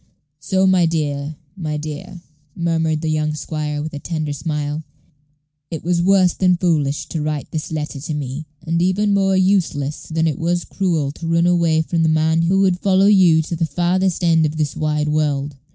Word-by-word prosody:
So, 190 +5 +1
my 185 -3 +4
dear, 150 -2 -2 0.2
my 155 -5 -3
dear," 155 +3 -7 0.3
murmured 160 -2 0
the 160 - 0
young 155 0 0
squire, 150 0 -3
with 155 - -6
a 145 - -5
tender 155 -2 -3
smile, 150 +1 -3 0.9
"it 165 - -6
was 170 0 +1
worse 185 -1 +4
than 180 -2 +2
foolish 150 -5 0
to 160 - -3
write 150 -1 -3
this 155 0 -4
letter 150 -2 -4
to 155 +2 -4
me, 145 +2 -5 0.2
and 165 +1 0
even 200 +3 +2
more 195 -1 +2
useless 175 -7 0
than 160 0 0
it 155 -4 -1
was 175 +1 0
cruel 165 -7 -1
to 165 +3 -7
run 165 +1 +2
away 170 -2 +3
from 165 +1 -1
the 160 - +3
man 160 +1 +2
who 185 +4 +2
would 185 -2 +2
follow 190 0 +3
you 180 -6 +5
to 170 - -4
the 165 0 -1
farthest 180 +4 0
end 165 -2 +4
of 155 0 -1
this 150 -2 -1
wide 150 -1 -1
world." 145 -2 -1
160 Hz, 190 wpm, -19 LUFS, 150-175 Hz, 0.9 s, you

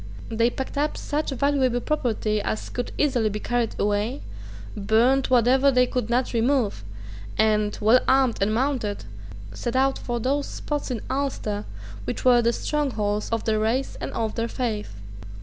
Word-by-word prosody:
They 230 +1 +2
packed 265 +3 -4
up 300 +1 0
such 300 +1 -2
valuable 270 -2 +1
property 225 -7 -1
as 215 - -3
could 245 - -4
easily 250 -7 +2
be 210 +1 -4
carried 240 0 -1
away, 210 +6 0 0.5
burned 235 +6 +3
whatever 255 +3 +4
they 250 -2 +4
could 245 -2 -2
not 245 +2 +1
remove, 235 - +1 0.5
and, 215 -1 +2
well 225 +4 +5
armed 260 -4 +3
and 200 +2 +2
mounted, 235 - -1 0.5
set 235 - -4
out 270 +1 +2
for 240 -1 -3
those 275 +4 0
spots 295 -2 -4
in 245 -4 -3
Ulster 255 -7 -2 0.4
which - - -4
were 245 -1 +6
the 235 0 +2
strongholds 225 -7 -1
of 230 -1 -1
their 215 -1 +1
race 235 +5 0
and - - -4
of 220 -2 -2
their 230 0 -1
faith. 220 - -3
240 Hz, 160 wpm, -24 LUFS, 215-265 Hz, 0.5 s, were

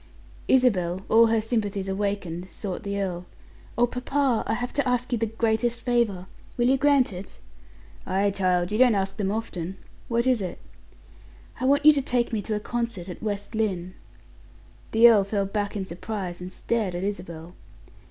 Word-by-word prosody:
Isabel, 190 -8 +2
all 230 +1 +6
her 225 0 +2
sympathies 210 -3 -2
awakened, 190 -3 -2
sought 190 +1 -5
the 200 -2 -3
earl. 180 -2 -3 0.5
"Oh, 240 - +5
papa! 250 0 0
I - - +1
have 245 +1 -4
to 285 -2 0
ask 250 0 0
you 240 - +1
the 225 - 0
greatest 225 +1 0
favor. 235 -7 +1 0.3
Will 240 0 +3
you 270 - +4
grant 275 -5 +3
it?" 180 +2 -9 0.7
"Ay, 195 +2 +1
child, 180 -2 +1
you 215 - 0
don't 250 -4 +6
ask 195 0 -2
them 200 -3 -1
often. 190 -4 -4 0.3
What 235 0 +1
is 255 -4 +2
it?" 180 -2 -4 1.0
"I 255 - -1
want 285 +2 +3
you 305 - +11
to 285 -2 +1
take 245 -2 0
me 215 - 0
to 215 +2 -2
a - - -1
concert 230 -5 -3
at 180 - -8
West 205 -1 -4
Lynne." 185 -5 -1 1.0
The 225 +2 +7
earl 220 -4 +6
fell 200 0 -1
back 205 +1 -3
in 195 - -3
surprise, 185 0 -5
and 180 +1 -6
stared 210 -3 -2
at 175 - -3
Isabel. 175 -4 -5
210 Hz, 180 wpm, -25 LUFS, 190-240 Hz, 1.0 s, you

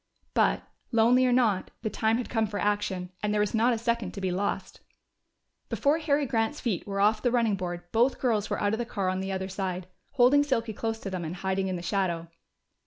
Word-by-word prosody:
But, - - +2 0.3
lonely 240 +2 +4
or - - +2
not, 225 -6 +2
the 220 - 0
time 220 +2 +1
had 245 - -3
come 225 -2 0
for 205 0 -4
action, 200 -3 -1
and 210 - 0
there 210 - +1
was 210 -1 +1
not 230 +2 +3
a 235 - +1
second 230 -4 -1
to - - -5
be 190 -1 0
lost. 195 +3 -2 0.9
Before 295 +3 +2
Harry 295 -2 +1
Grant's 230 +3 0
feet 215 -8 -2
were 195 -1 -2
off 215 +2 +3
the 245 - +2
running 235 -3 +2
board 175 -2 -4
both 240 +4 +2
girls 220 -5 +1
were - - -1
out 205 0 +1
of 220 - -1
the - - 0
car 200 -5 -2
on 185 0 -1
the 190 0 -3
other 190 0 -2
side, 185 -1 -3 0.3
holding 275 +2 +5
Silky 235 -6 -1
close 225 +1 -2
to 195 - -5
them 185 -2 -3
and 165 +2 -4
hiding 190 +1 -1
in 185 - -2
the 175 - -5
shadow. 175 -3 -1
210 Hz, 230 wpm, -28 LUFS, 190-235 Hz, 0.9 s, holding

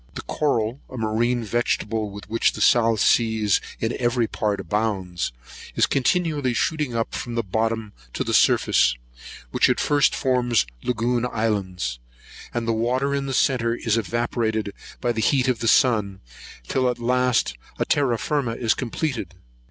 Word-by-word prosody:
The - - -6
coral, 125 -4 -1
a 130 - -8
marine 115 +2 0
vegetable, 110 -1 -1
with 100 +1 -10
which 115 - +1
the - - -7
South 115 -2 +4
Seas 110 -3 +3 0.2
in 115 +1 -1
every 120 -1 +1
part 105 -2 -2
abounds, 95 -2 -2 0.4
is - - +4
continually 145 -2 0
shooting 150 -3 -1
up 115 0 -2
from 120 -1 -4
the 115 - 0
bottom 110 +1 -2 0.2
to - - -1
the - - -3
surface, - - +4 0.6
which - - +3
at - - +1
first 145 -1 +3
forms 125 - +1 0.2
lagoon 120 0 0
islands; 95 - -2 0.5
and 120 -1 -3
the 115 - +2
water 125 +5 0
in 140 -1 -1
the 135 - -3
centre 120 -3 +2
is 115 -2 0
evaporated 110 -2 -1 0.3
by 120 - +1
the 115 -1 -2
heat 130 +3 +2
of 125 -3 +1
the 115 - -2
sun, 105 -6 +3 0.5
till 130 -1 +1
at 125 - -2
last 125 - +1 0.2
a - - 0
terra 130 -5 +1
firma 125 0 -1
is 115 -2 +1
completed. 125 - -3
115 Hz, 160 wpm, -23 LUFS, 110-125 Hz, 0.6 s, South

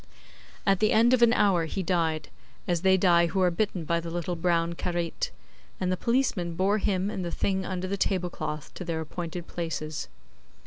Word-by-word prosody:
At 195 -2 +3
the 215 - +3
end 235 +3 +5
of 255 - +3
an 235 -1 +7
hour 195 -8 +3
he 190 +4 -3
died, 165 -3 0 0.4
as 175 -2 +1
they 190 0 +5
die 170 -2 +4
who 185 +4 -2
are 180 -1 +4
bitten 185 -1 -1
by 170 +2 +1
the 170 0 -6
little 175 +1 -3
brown 170 0 +1
karait, 175 -1 -2 0.5
and 185 0 0
the - - +2
policemen 210 -6 0
bore 195 +4 +2
him 195 -1 0
and 190 - -3
the 175 - -3
thing 190 +1 -1
under 185 -1 -3
the 200 +1 -2
tablecloth 175 -6 -2
to - - -6
their 165 -2 -2
appointed 170 +2 -5
places. 155 - -4
180 Hz, 190 wpm, -27 LUFS, 170-195 Hz, 0.5 s, an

